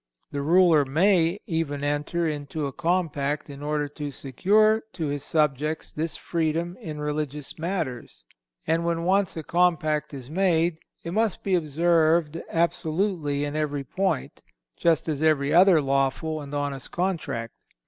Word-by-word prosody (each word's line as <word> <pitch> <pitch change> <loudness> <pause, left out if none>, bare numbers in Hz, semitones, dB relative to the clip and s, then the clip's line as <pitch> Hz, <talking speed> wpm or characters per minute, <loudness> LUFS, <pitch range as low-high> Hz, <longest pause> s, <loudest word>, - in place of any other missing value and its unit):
The 140 - -3
ruler 165 0 +5
may 170 +5 +3
even 160 -7 -2
enter 150 +4 -1
into 150 0 -3
a 140 - -4
compact 150 -4 -1
in 140 0 -10
order 150 0 -1
to 145 0 -5
secure 205 - +2
to 165 - -3
his 145 -1 -2
subjects 150 0 0
this 160 +1 -2
freedom 170 +1 -1
in 155 -2 -6
religious 150 0 -4
matters; 165 - -4 0.4
and 165 +1 +1
when 170 0 -1
once 190 0 +1
a 160 - -4
compact 160 -3 +1
is 135 -4 -8
made 170 0 +1 0.2
it 170 - -5
must 220 +2 0
be 195 - 0
observed 165 0 +2
absolutely 165 -3 0
in 145 +1 -4
every 145 -2 -1
point, 185 +2 -2 0.3
just 165 -1 +2
as 150 -2 -2
every 150 -3 +2
other 180 -1 +7
lawful 140 +3 0
and 140 -1 -9
honest 145 -2 -3
contract. 170 -11 -2
155 Hz, 145 wpm, -25 LUFS, 145-170 Hz, 0.4 s, other